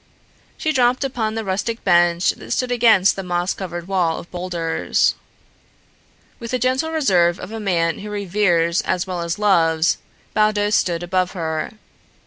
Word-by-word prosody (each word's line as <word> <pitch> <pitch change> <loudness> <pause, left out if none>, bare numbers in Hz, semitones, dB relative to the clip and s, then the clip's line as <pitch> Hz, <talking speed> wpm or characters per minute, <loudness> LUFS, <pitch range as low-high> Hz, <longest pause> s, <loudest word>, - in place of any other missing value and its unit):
She 315 - -1
dropped 250 0 +2
upon 230 -5 -2
the 225 - -2
rustic 210 +5 -2
bench 175 -1 +3
that - - -12
stood 255 -1 -1
against 225 -5 +4
the 195 - -4
moss 175 0 -1
covered 175 -2 -6
wall 180 -4 0
of 170 - -10
boulders. 175 -2 0 1.3
With 235 - -7
the 255 - 0
gentle 255 +5 0
reserve 185 - +2
of 180 - -8
a 225 - -5
man 170 -5 0
who 210 - -7
reveres 185 -4 +1
as 180 -1 -1
well 180 -2 -4
as 170 0 -3
loves, 165 -6 +2 0.3
Baldos 210 -1 +2
stood 175 -4 +1
above 180 0 0
her. 160 -4 -3
185 Hz, 155 wpm, -20 LUFS, 175-215 Hz, 1.3 s, against